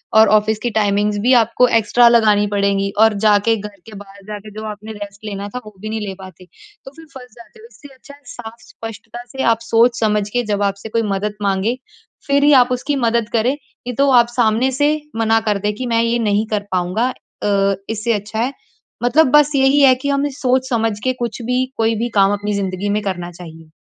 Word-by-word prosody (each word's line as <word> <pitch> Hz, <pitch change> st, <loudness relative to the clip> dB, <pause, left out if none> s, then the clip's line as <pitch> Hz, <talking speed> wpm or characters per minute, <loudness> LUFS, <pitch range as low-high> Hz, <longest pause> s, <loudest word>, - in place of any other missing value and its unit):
और 220 Hz, 0 st, +7 dB
ऑफ़िस 215 Hz, +1 st, -1 dB
की 240 Hz, -, 0 dB
टाइमिंग्स 205 Hz, 0 st, +1 dB
भी 250 Hz, +5 st, +3 dB
आपको 235 Hz, +3 st, +2 dB
एक्स्ट्रा 235 Hz, +3 st, +4 dB
लगानी 215 Hz, -3 st, +3 dB
पड़ेंगी 200 Hz, -1 st, 0 dB
और 220 Hz, 0 st, +5 dB
जा 210 Hz, -1 st, +6 dB
के 225 Hz, -, +4 dB
घर 205 Hz, -1 st, -9 dB
के 220 Hz, -, -11 dB
बाहर 200 Hz, 0 st, -14 dB
जाके 210 Hz, 0 st, -8 dB
जो -, -, -7 dB
आपने 210 Hz, +1 st, -10 dB
रेस्ट 205 Hz, 0 st, -10 dB
लेना 200 Hz, -1 st, -5 dB
था -, -, -2 dB
वो 215 Hz, -, -12 dB
भी 215 Hz, -, -6 dB
नहीं 220 Hz, 0 st, -3 dB
ले 195 Hz, -, -4 dB
पाते 185 Hz, -1 st, -13 dB, 0.4 s
तो 270 Hz, -, -10 dB
फ़िर 325 Hz, -, -13 dB
फँस 250 Hz, -2 st, -11 dB
जाते 235 Hz, -, -16 dB
हो। 445 Hz, -, -14 dB
इससे 285 Hz, -, -15 dB
अच्छा 270 Hz, +2 st, -15 dB
है 290 Hz, -, -25 dB
साफ़ 225 Hz, -1 st, -9 dB
स्पष्टता 225 Hz, +2 st, -9 dB
से 265 Hz, 0 st, -4 dB
आप 225 Hz, -, -7 dB
सोच 230 Hz, +1 st, +2 dB
समझ 210 Hz, -2 st, 0 dB
के 245 Hz, +2 st, -1 dB
जब 205 Hz, 0 st, -1 dB
आपसे 200 Hz, +2 st, -3 dB
कोई 230 Hz, +1 st, 0 dB
मदद 210 Hz, +2 st, -3 dB
मांगे 200 Hz, +4 st, 0 dB, 0.5 s
फ़िर 280 Hz, 0 st, +2 dB
ही 295 Hz, -, +6 dB
आप 250 Hz, -, -10 dB
उसकी 275 Hz, +3 st, -1 dB
मदद 230 Hz, -1 st, 0 dB
करें 230 Hz, +2 st, +2 dB
नहीं 250 Hz, -4 st, -10 dB
तो 280 Hz, 0 st, +2 dB
आप 235 Hz, -, -3 dB
सामने 235 Hz, +3 st, +2 dB
से 290 Hz, -, +4 dB, 0.3 s
मना 225 Hz, 0 st, +2 dB
कर 205 Hz, -, +1 dB
दें 210 Hz, -, +1 dB
कि 255 Hz, +4 st, -5 dB
मैं 230 Hz, -, +3 dB
ये 235 Hz, +1 st, 0 dB
नहीं 205 Hz, +2 st, +1 dB
कर 210 Hz, -, 0 dB
पाऊँगा। 185 Hz, +7 st, 0 dB, 0.3 s
अ, 200 Hz, -1 st, +1 dB
इससे 225 Hz, +1 st, -1 dB
अच्छा 210 Hz, +1 st, -4 dB
है 250 Hz, +4 st, -1 dB, 0.5 s
मतलब 260 Hz, +3 st, +3 dB
बस 295 Hz, 0 st, +5 dB
यही 270 Hz, +2 st, +3 dB
है 260 Hz, -2 st, +6 dB
कि 280 Hz, +3 st, -4 dB
हमें 280 Hz, +1 st, 0 dB
सोच 260 Hz, 0 st, 0 dB
समझ 225 Hz, -2 st, 0 dB
के 255 Hz, -, +1 dB
कुछ 235 Hz, +1 st, -4 dB
भी 250 Hz, +1 st, 0 dB
कोई 225 Hz, 0 st, +1 dB
भी 235 Hz, +3 st, -2 dB
काम 195 Hz, +1 st, +4 dB
अपनी 205 Hz, +1 st, -3 dB
जिंदगी 195 Hz, 0 st, -3 dB
में 210 Hz, +1 st, 0 dB
करना 175 Hz, -3 st, -4 dB
चाहिए। 165 Hz, -2 st, -13 dB
220 Hz, 225 wpm, -18 LUFS, 205-245 Hz, 0.5 s, और